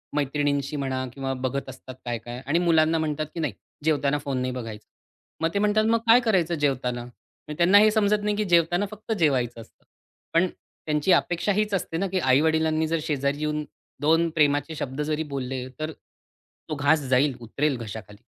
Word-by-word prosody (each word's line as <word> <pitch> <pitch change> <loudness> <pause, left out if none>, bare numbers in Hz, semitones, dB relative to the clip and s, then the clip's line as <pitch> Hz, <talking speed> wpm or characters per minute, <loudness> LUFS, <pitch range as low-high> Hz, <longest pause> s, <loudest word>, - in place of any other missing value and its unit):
मैत्रिणींशी 145 0 0
म्हणा 130 -2 -2
किंवा 135 -1 -3
बघत 130 +1 -3
असतात 130 0 -10
काय-काय 120 +1 -5
आणि 160 +5 +2
मुलांना 165 -2 +3
म्हणतात, 155 -1 -1
की - - -6
"नाही, 150 -8 -1 0.3
जेवताना 145 -2 +2
फोन 140 -2 -3
नाही 130 0 -1
बघायचा." 115 -4 -7 0.6
मग 165 - +3
ते 200 - +1
म्हणतात, 210 +1 +3
"मग 230 +1 +3
काय 235 +2 +8
करायचं 185 -8 +1
जेवताना?" 125 -5 -1 0.5
त्यांना 175 +4 +6
हे 215 0 +6
समजत 210 -1 +2
नाही, 210 0 0
की 210 - 0
जेवताना 175 +2 +3
फक्त 215 +2 -8
जेवायचं 125 -7 +1
असतं. 115 - -19 0.5
पण 170 +3 +4 0.4
त्यांची 150 +4 +1
अपेक्षा 175 +4 +2
हीच 210 +1 0
असते 165 -3 -1
ना, 195 +2 0
की 185 0 -1
आई-वडिलांनी 160 +3 +2
जर 165 0 0
शेजारी 145 -2 -1
येऊन 150 0 -1 0.4
दोन 165 +3 +3
प्रेमाचे 145 0 +2
शब्द 140 -1 -4
जरी 155 +1 -1
बोलले, 130 -1 -3
तर 155 +1 -3
तो 155 0 -13
घास 145 +2 +3
जाईल, 130 +1 +3
उतरेल 135 +4 -1
घशाखाली. 105 -2 -9
150 Hz, 175 wpm, -25 LUFS, 130-170 Hz, 0.6 s, काय